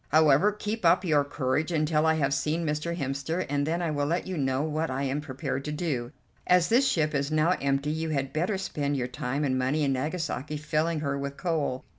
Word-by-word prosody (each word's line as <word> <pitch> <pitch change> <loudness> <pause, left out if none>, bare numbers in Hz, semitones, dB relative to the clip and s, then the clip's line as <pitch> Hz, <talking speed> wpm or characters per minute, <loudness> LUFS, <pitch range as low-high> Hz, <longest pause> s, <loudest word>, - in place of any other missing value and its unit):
However, 155 +5 +5
keep 210 +1 -4
up 175 +2 +4
your 150 -4 +3
courage 140 +3 -1
until 155 -1 +2
I 160 - +4
have 140 -3 +1
seen 155 +4 0
Mr. 150 +3 -2
Hemster, 140 +5 -2
and 145 +1 0
then 170 +2 0
I 165 - 0
will 145 -1 0
let 170 +4 0
you 185 - -4
know 135 -2 0
what 155 +1 -1
I 130 +2 -2
am 140 +2 -1
prepared 135 -1 -4
to 150 - -3
do. 145 -6 -2 0.4
As 180 -1 +4
this 255 +4 +4
ship 155 -2 +1
is 140 0 0
now 155 +2 +2
empty 140 +1 0
you 160 +1 -2
had 135 -3 -2
better 180 +6 0
spend 145 -6 -2
your 125 -1 -1
time 125 +2 -3
and 130 -2 +1
money 140 +4 +1
in 140 -1 +2
Nagasaki 150 +1 -3
filling 155 +2 -1
her 140 -2 -1
with 140 0 -5
coal. 155 -7 -1
150 Hz, 220 wpm, -27 LUFS, 140-165 Hz, 0.4 s, However